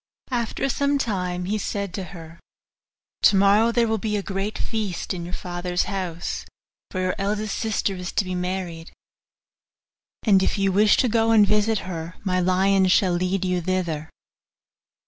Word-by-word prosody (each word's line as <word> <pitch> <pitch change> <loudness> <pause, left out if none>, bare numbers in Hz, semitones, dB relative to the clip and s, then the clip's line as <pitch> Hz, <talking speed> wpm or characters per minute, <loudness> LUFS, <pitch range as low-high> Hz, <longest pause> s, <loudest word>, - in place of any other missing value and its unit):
After 240 +2 -1
some 280 +1 +1
time 180 -7 -2
he 210 +3 -1
said 200 -2 -3
to 190 -1 -4
her, 165 -1 -11 0.8
'Tomorrow 200 +3 +5
there 235 0 +2
will 220 0 0
be 210 +1 -1
a 200 - -3
great 195 +2 -3
feast 210 -7 -3
in 175 -2 -5
your 175 - -7
father's 175 0 -2
house, 180 -4 -4 0.5
for 185 - -4
your 185 0 0
eldest 210 +1 -1
sister 215 -3 -1
is 180 -1 -5
to 205 - +1
be 185 - -4
married; 180 -2 -4 1.3
and 195 -4 +5
if 190 - 0
you 195 -1 +2
wish 210 +3 +4
to 255 - +3
go 225 0 +2
and 220 -2 +6
visit 210 +2 +2
her 170 -1 -6
my 185 -2 +1
lions 190 +1 +3
shall 185 -3 +4
lead 185 +2 0
you 180 -1 0
thither. 165 -4 -2
190 Hz, 165 wpm, -24 LUFS, 180-210 Hz, 1.3 s, and